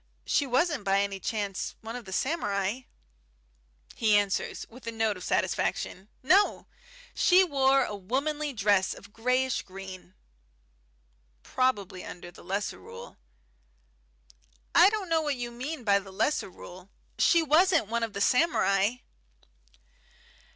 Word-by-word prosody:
She 285 - +1
wasn't 270 - +1
by 195 0 +2
any 200 -1 -3
chance 200 -2 -3
one 225 +1 -7
of 245 -2 -7
the 190 - -9
samurai?" 205 - -1 1.1
He 215 -2 +3
answers, 205 -1 -1
with 245 +1 -14
a - - -1
note 225 -2 0
of 185 - -10
satisfaction, 190 +3 -1
"No! 380 +9 +3 0.5
She 370 +1 +5
wore 270 -5 +3
a 210 - -4
womanly 280 +9 -2
dress 205 -5 +1
of 200 +1 -15
greyish 250 +2 0
green." 185 -1 -10 1.3
"Probably 205 -8 -1
under 175 0 -9
the - - -15
Lesser 200 - -3
Rule." 95 0 -11 1.6
"I 380 - +7
don't 420 -3 -3
know 325 -1 +2
what 295 -2 -1
you 240 -1 -5
mean 255 +4 -6
by 200 -2 +4
the 195 -1 -12
Lesser 195 +4 0
Rule. 185 +1 -12 0.3
She 335 -1 +4
wasn't 325 - +4
one 235 +3 -2
of 225 -2 -3
the 200 - -4
samurai." 215 - +2
225 Hz, 135 wpm, -28 LUFS, 195-275 Hz, 1.6 s, I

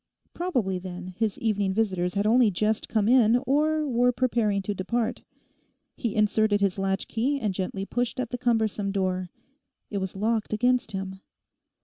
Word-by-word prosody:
Probably, 245 - -1
then, 180 0 -7
his 220 -1 -1
evening 205 -4 0
visitors 185 -4 0
had 200 +1 +1
only 230 +1 +5
just 215 +3 -1
come 215 -2 +1
in, 240 -2 +5
or 305 +2 +2
were 245 -1 +3
preparing 230 -6 0
to 205 - -2
depart. 225 +5 -2 0.7
He 235 -5 -3
inserted 215 0 +3
his 195 -1 0
latchkey 220 +8 0
and 210 -6 -1
gently 190 +1 -3
pushed 245 +3 -2
at 250 -2 -3
the 245 - -3
cumbersome 220 -4 0
door. 185 -2 -1 0.6
It 200 - -1
was 190 0 -4
locked 215 +2 -1
against 245 +2 +1
him. 190 0 -5
215 Hz, 155 wpm, -26 LUFS, 195-240 Hz, 0.7 s, only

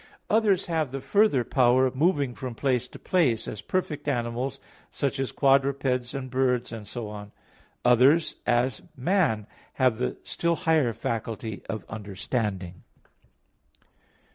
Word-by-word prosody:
Others 210 -4 +3
have 160 -4 0
the 135 - -4
further 200 - +3
power 125 +1 +4
of 130 - -1
moving 145 -3 +2
from 125 -1 -6
place 125 -1 0
to - - -12
place, 150 - +1
as 105 - -6
perfect 155 -6 -2
animals, 125 0 -2 0.3
such 140 -1 -2
as 135 - -1
quadrupeds, 135 -2 +2
and 130 -2 -5
birds, 125 -1 +1
and 110 -3 -7
so 120 0 -5
on. 105 -1 -8 0.5
Others, 130 +7 +4
as 120 -1 +1 0.2
man, 135 - +1 0.3
have 125 -4 +2
the 125 - -1
still 170 0 0
higher 155 -8 +2
faculty 110 -1 -4
of 110 - -4
understanding. 100 -3 -4
130 Hz, 135 wpm, -26 LUFS, 115-140 Hz, 0.5 s, power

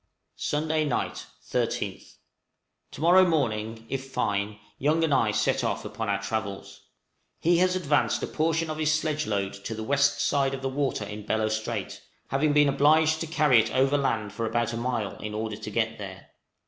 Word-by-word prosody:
Sunday 155 +1 0
night, 145 -4 -2 0.2
13th. - - -2 0.8
To - - -8
morrow 180 +3 +6
morning, 115 -9 -1
if 135 +2 -4
fine, 105 -3 -1 0.2
Young 155 +4 +2
and 155 -3 +2
I 115 -5 +3
set 105 - +1
off - - -2
upon 110 -2 -4
our 100 0 +1
travels. 100 -1 -4 0.6
He 170 +1 +3
has 185 0 +3
advanced 150 -5 +1
a - - +2
portion 160 0 0
of 155 - -5
his 155 -1 +2
sledge 155 -1 0
load 100 -2 -1
to 100 +3 -6
the 110 - -5
west 140 +3 +2
side 135 -2 +1
of 135 - -9
the 135 - 0
water 135 -5 -1
in 105 +1 -8
Bellot 110 0 +1
Strait, 110 -1 -3 0.3
having 145 +2 +2
been 145 0 +5
obliged 155 +3 +4
to 165 - -2
carry 150 -6 +4
it 110 0 +1
overland 130 -6 +1
for 115 +2 -2
about 120 +1 0
a - - -2
mile 115 -4 -2
in 105 0 -6
order 110 -1 -3
to 105 - -7
get 110 +1 -1
there. 95 -2 -9
130 Hz, 185 wpm, -27 LUFS, 110-150 Hz, 0.8 s, morrow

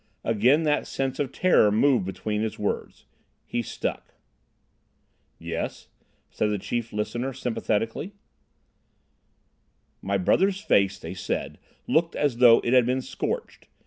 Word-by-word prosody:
Again 120 +8 +3
that 150 -1 +1
sense 135 -1 -3
of 140 -3 -1
terror 175 - +4
moved 120 0 +3
between 105 +3 -3
his 110 -1 -3
words. 105 - -4 0.4
He 120 - -2
stuck. 115 - -5 1.2
"Yes," - - -5 0.4
said 105 - 0
the 105 - 0
chief 115 +4 -3
listener 120 +5 -3
sympathetically. 120 - -2 1.9
"My 100 +1 0
brother's 190 - +2
face, 100 - +2
they - - -7
said, - - -4 0.3
looked 165 +1 +1
as 145 -5 0
though 120 -2 +7
it 120 - 0
had 125 -2 +5
been 130 +1 0
scorched. - - -5
120 Hz, 125 wpm, -25 LUFS, 105-135 Hz, 1.9 s, though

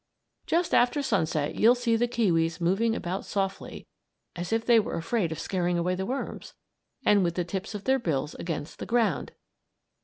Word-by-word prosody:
Just 340 +1 +1
after 250 +4 +3
sunset, 160 - 0
you'll 235 +3 +5
see 240 -2 +1
the 240 +2 +2
kiwis 170 -8 +1
moving 195 +7 +1
about 185 -2 -3
softly 195 -1 -3 0.5
(as 175 0 -5
if 225 0 0
they 235 -1 +6
were 215 - -2
afraid 170 +1 -1
of 160 - -4
scaring 180 -2 -1
away 175 +2 0
the 190 +1 -3
worms!), 265 +3 -5 0.5
and 205 -2 +5
with 170 -1 0
the 180 - 0
tips 195 +4 -5
of 205 - -6
their 265 0 +2
bills 150 - -2
against 160 -2 -5
the - - -6
ground. 230 - +1
195 Hz, 180 wpm, -27 LUFS, 170-230 Hz, 0.5 s, they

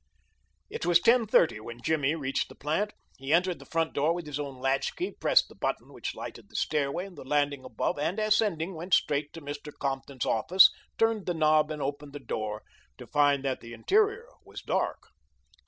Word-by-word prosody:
It 455 - -5
was 175 -1 +5
ten 230 +3 +4
thirty 165 - +3
when 115 +2 -9
Jimmy 155 -2 +1
reached 135 -4 -2
the - - -13
plant. 160 +9 -1 0.3
He 135 +2 -4
entered 180 +2 +2
the - - -14
front 165 -1 -1
door 155 +4 +2
with 175 -2 -5
his 150 -1 -5
own 140 -3 -5
latchkey, 135 - -1
pressed - - +4
the - - -15
button - - -3
which - - -5
lighted - - -8
the - - -19
stairway 150 +4 0
and 195 -2 -12
the - - -9
landing 145 0 0
above, 115 - -2
and, 170 +7 -1
ascending, 210 -5 +1
went 170 +2 +1
straight 145 0 0
to 165 - -9
Mr. 145 +1 -7
Compton's 135 -2 -3
office, 180 - +6 0.3
turned 225 -3 +1
the 175 - 0
knob, 155 -1 +3
and 150 -2 -4
opened 145 +1 -5
the 145 - -6
door, 110 -3 -4 0.3
to - - -10
find 145 -2 +2
that 130 -1 -1
the 115 0 -10
interior 425 - +1 0.2
was - - -10
dark. - - -2
150 Hz, 195 wpm, -28 LUFS, 140-180 Hz, 0.3 s, office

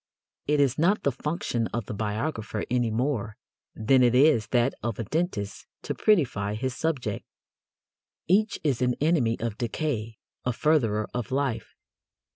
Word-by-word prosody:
It 150 0 +2
is 135 0 +2
not 190 +6 +3
the 140 - +2
function 130 -4 -2
of 120 -3 -4
the - - -5
biographer 110 +1 -3
any 120 -2 +2
more 115 -2 -1 0.4
than 130 +4 +3
it 125 -1 +4
is 135 -5 +5
that 120 +1 +2
of 115 -3 -3
a 115 - -2
dentist 115 - -3 0.2
to - - -2
prettify 120 - +1
his 130 +3 -3
subject. 130 -11 -2 1.0
Each 205 +5 +2
is 135 -5 0
an 125 -1 +2
enemy 145 -7 +2
of 115 -2 -3
decay, 115 -3 -2 0.3
a 125 - 0
furtherer 115 -8 +2
of 125 -2 -3
life. 130 -4 -2
125 Hz, 150 wpm, -27 LUFS, 110-150 Hz, 1.0 s, is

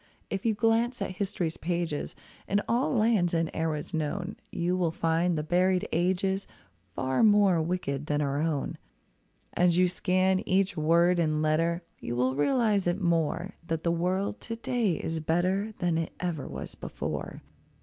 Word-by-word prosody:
If 195 +3 -1
you 220 - +2
glance 230 +3 +2
at 185 - -5
history's 185 -5 -2
pages, 170 -3 -2 0.3
In 200 - +2
all 240 +4 +1
lands 215 -7 +2
and 165 -1 0
eras 160 -2 -2
known, 175 +6 -2 0.2
You 175 +2 0
will 180 -2 +1
find 165 +1 +1
the 150 - -1
buried 180 +3 +2
ages 190 +3 0 0.5
Far 130 0 0
more 205 -5 +5
wicked 155 -4 -2
than 150 -1 +1
our 140 -1 0
own. 155 -3 -2 0.7
As 175 -1 +3
you 180 0 +5
scan 185 +1 +2
each 190 0 +2
word 170 +3 +3
and 155 -2 +1
letter. 165 +3 +1 0.2
You 120 - -4
will 125 +1 +1
realise 205 - +2
it 175 +3 +1
more, 170 +1 0
That 165 -1 -2
the 170 - +2
world 185 +4 -1
to 230 - -5
day 230 -4 0
is 160 +1 -3
better 185 +7 0
Than 175 -4 0
it 165 - -3
ever 170 -5 -3
was - - -7
before. - - -5
175 Hz, 160 wpm, -28 LUFS, 160-195 Hz, 0.7 s, more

